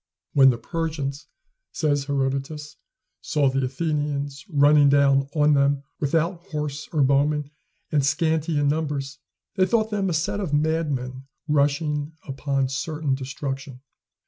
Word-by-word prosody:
"When 135 Hz, -1 st, +7 dB
the 120 Hz, -, +1 dB
Persians," 150 Hz, +1 st, -4 dB, 0.4 s
says 145 Hz, -3 st, 0 dB
Herodotus, 140 Hz, +2 st, -2 dB, 0.5 s
"saw 145 Hz, -4 st, +1 dB
the 135 Hz, 0 st, 0 dB
Athenians 145 Hz, 0 st, -2 dB
running 145 Hz, -2 st, +5 dB
down 140 Hz, -1 st, +3 dB
on 150 Hz, 0 st, +4 dB
them, 140 Hz, 0 st, +2 dB, 0.2 s
without 165 Hz, +4 st, 0 dB
horse 150 Hz, -3 st, -4 dB
or 150 Hz, -4 st, +2 dB
bowmen, 145 Hz, +2 st, +2 dB, 0.4 s
and 145 Hz, -3 st, +2 dB
scanty 160 Hz, +2 st, +1 dB
in 145 Hz, 0 st, +2 dB
numbers, 145 Hz, -2 st, -2 dB, 0.4 s
they 185 Hz, 0 st, +4 dB
thought 220 Hz, 0 st, +1 dB
them 200 Hz, -2 st, 0 dB
a -, -, -1 dB
set 165 Hz, +5 st, -1 dB
of 170 Hz, -8 st, -1 dB
madmen 145 Hz, -4 st, -1 dB, 0.2 s
rushing 150 Hz, +1 st, +1 dB
upon 135 Hz, -1 st, -1 dB
certain 150 Hz, +1 st, -2 dB
destruction." 135 Hz, 0 st, -5 dB
145 Hz, 130 wpm, -24 LUFS, 140-155 Hz, 0.5 s, When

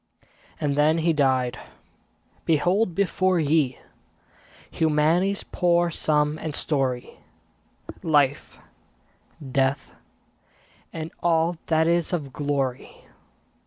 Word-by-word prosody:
And 145 Hz, -2 st, -1 dB
then 150 Hz, +2 st, +3 dB
he 165 Hz, 0 st, +1 dB
died! 130 Hz, -4 st, +1 dB, 0.8 s
Behold 175 Hz, +4 st, +1 dB
before 185 Hz, -1 st, +1 dB
ye 150 Hz, -4 st, +1 dB, 0.9 s
Humanity's 160 Hz, +5 st, +1 dB
poor 175 Hz, -1 st, +1 dB
sum 150 Hz, -1 st, 0 dB
and 155 Hz, -2 st, -5 dB
story; 130 Hz, -5 st, -2 dB, 0.8 s
Life, 145 Hz, -3 st, +1 dB, 0.9 s
Death, 135 Hz, +1 st, 0 dB, 1.0 s
and 160 Hz, 0 st, -6 dB
all 170 Hz, 0 st, +1 dB
that 160 Hz, -1 st, +2 dB
is 170 Hz, +1 st, +1 dB
of 145 Hz, -7 st, -3 dB
glory. 140 Hz, -3 st, -3 dB
155 Hz, 90 wpm, -24 LUFS, 140-170 Hz, 1.0 s, then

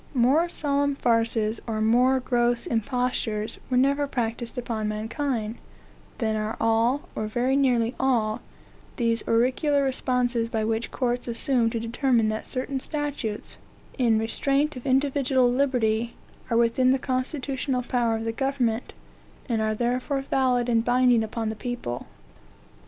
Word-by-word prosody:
More 275 Hz, +8 st, +3 dB
solemn 285 Hz, -2 st, 0 dB
farces, 230 Hz, -3 st, +1 dB
or 220 Hz, -1 st, -2 dB
more 245 Hz, +4 st, +4 dB
gross 240 Hz, -1 st, +1 dB
impostures, 230 Hz, -2 st, -1 dB
were 250 Hz, -, +1 dB
never 280 Hz, +2 st, +2 dB
practised 235 Hz, -1 st, -3 dB
upon 225 Hz, -3 st, -2 dB
mankind, 220 Hz, +1 st, -3 dB, 0.6 s
than 220 Hz, -3 st, 0 dB
are 215 Hz, +1 st, -2 dB
all, 230 Hz, +6 st, +2 dB
or 215 Hz, -, -3 dB
very 245 Hz, +5 st, 0 dB
nearly 245 Hz, -4 st, +2 dB
all, 235 Hz, -4 st, +1 dB, 0.5 s
those 230 Hz, -3 st, +1 dB
oracular 260 Hz, +5 st, +2 dB
responses 250 Hz, -3 st, 0 dB
by 220 Hz, -1 st, -1 dB
which 225 Hz, +1 st, -1 dB
courts 245 Hz, -1 st, -2 dB
assume 235 Hz, 0 st, +1 dB
to 230 Hz, -, -3 dB
determine 230 Hz, 0 st, +1 dB
that 215 Hz, 0 st, -4 dB
certain 265 Hz, +1 st, -3 dB
statutes, 285 Hz, -7 st, -4 dB, 0.4 s
in 235 Hz, -4 st, +3 dB
restraint 275 Hz, +6 st, 0 dB
of 250 Hz, +1 st, -7 dB
individual 265 Hz, -2 st, +2 dB
liberty, 240 Hz, -4 st, +1 dB, 0.3 s
are 230 Hz, -, +2 dB
within 235 Hz, +2 st, +3 dB
the -, -, +2 dB
constitutional 260 Hz, 0 st, -2 dB
power 240 Hz, -2 st, +1 dB
of 225 Hz, -, -3 dB
the 225 Hz, -, -1 dB
government, 250 Hz, -2 st, -1 dB, 0.5 s
and 230 Hz, -4 st, 0 dB
are 215 Hz, 0 st, 0 dB
therefore 250 Hz, +4 st, -1 dB
valid 255 Hz, -3 st, +1 dB
and 230 Hz, -2 st, +2 dB
binding 245 Hz, -1 st, +4 dB
upon 220 Hz, 0 st, -3 dB
the 220 Hz, -, -4 dB
people. 215 Hz, -, -5 dB
245 Hz, 140 wpm, -25 LUFS, 225-265 Hz, 0.6 s, more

